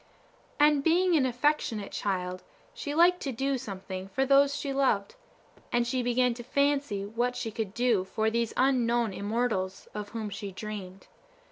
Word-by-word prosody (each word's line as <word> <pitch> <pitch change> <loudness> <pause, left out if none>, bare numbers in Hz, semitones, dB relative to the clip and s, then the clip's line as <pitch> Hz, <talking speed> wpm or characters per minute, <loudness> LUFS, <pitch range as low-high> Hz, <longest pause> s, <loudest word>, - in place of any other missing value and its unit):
And 295 -1 +5
being 350 +2 +3
an 270 -4 +3
affectionate 245 -5 0
child, 185 -2 -2 0.3
she 300 -12 -5
liked 355 +2 +5
to 275 - -2
do 270 +2 -1
something 190 -4 -6
for 265 +8 0
those 280 +1 +4
she 280 -2 -3
loved; 260 -7 +1 0.6
and 240 0 +2
she 255 +1 -1
began 245 0 +2
to 240 0 -8
fancy 280 -6 0
what 240 +4 -1
she 225 - -3
could 215 -2 -4
do 235 -5 +2
for 220 +3 -1
these 235 -1 0
unknown 240 -4 +2
immortals 205 -2 -2
of 210 -1 -5
whom 220 -2 -5
she 200 0 -6
dreamed. 195 -1 -7
235 Hz, 160 wpm, -29 LUFS, 205-275 Hz, 0.6 s, And